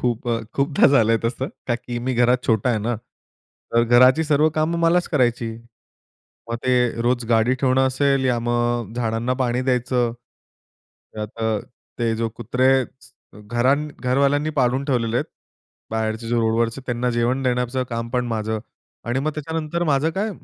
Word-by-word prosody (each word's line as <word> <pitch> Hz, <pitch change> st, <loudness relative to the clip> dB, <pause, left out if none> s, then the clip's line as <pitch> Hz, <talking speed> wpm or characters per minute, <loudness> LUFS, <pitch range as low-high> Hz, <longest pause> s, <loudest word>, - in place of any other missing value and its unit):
खूप 120 Hz, 0 st, -1 dB
अ, 115 Hz, -1 st, 0 dB
खूपदा 140 Hz, +1 st, +3 dB
झालंय 115 Hz, -5 st, +4 dB
तसं. 130 Hz, +3 st, -2 dB, 0.2 s
का 120 Hz, -, +1 dB
की 120 Hz, 0 st, -6 dB
मी 130 Hz, -, 0 dB
घरात 125 Hz, +1 st, +3 dB
छोटा 115 Hz, +2 st, +2 dB
आहे 110 Hz, -, +1 dB
ना, 120 Hz, -, 0 dB, 0.8 s
तर 115 Hz, 0 st, +4 dB
घराची 130 Hz, +6 st, +6 dB
सर्व 150 Hz, +1 st, +4 dB
कामं 165 Hz, +2 st, +1 dB
मलाच 175 Hz, +1 st, +3 dB
करायची. 120 Hz, -4 st, +1 dB, 1.0 s
मग 115 Hz, -, -1 dB
ते 130 Hz, 0 st, +3 dB, 0.3 s
रोज 120 Hz, -1 st, +1 dB
गाडी 115 Hz, +2 st, +3 dB
ठेवणं 130 Hz, 0 st, +3 dB
असेल 135 Hz, +1 st, +1 dB
या 125 Hz, -2 st, +2 dB
मग 120 Hz, -2 st, 0 dB
अ, -, -, -11 dB
झाडांना 115 Hz, +1 st, -1 dB
पाणी 125 Hz, 0 st, 0 dB
द्यायचं. 125 Hz, -1 st, 0 dB, 1.0 s
त्यात 105 Hz, -1 st, -5 dB
अ, 110 Hz, -1 st, +1 dB, 0.4 s
ते 115 Hz, -2 st, +1 dB
जो 115 Hz, 0 st, -1 dB
कुत्रे 125 Hz, +3 st, +1 dB, 0.9 s
घरां 135 Hz, +5 st, +2 dB
घरवाल्यांनी 140 Hz, +4 st, +1 dB
पाळून 130 Hz, +2 st, +1 dB
ठेवलेले 120 Hz, -4 st, 0 dB
आहेत. -, -, 0 dB, 0.7 s
बाहेरचे 110 Hz, +1 st, -2 dB
जे 120 Hz, -, 0 dB
रोडवरचे 115 Hz, +2 st, +1 dB
त्यांना 125 Hz, 0 st, -1 dB
जेवण 120 Hz, +3 st, 0 dB
देण्याचं 125 Hz, 0 st, 0 dB
काम 115 Hz, 0 st, -3 dB
पण 125 Hz, 0 st, -1 dB
माझं. 110 Hz, -1 st, -2 dB, 0.4 s
आणि 120 Hz, +2 st, -1 dB
मग 155 Hz, +2 st, -1 dB
त्याच्यानंतर 160 Hz, +2 st, -3 dB
माझं 150 Hz, +1 st, +2 dB
काय 215 Hz, +2 st, 0 dB
125 Hz, 160 wpm, -22 LUFS, 115-135 Hz, 1.0 s, घराची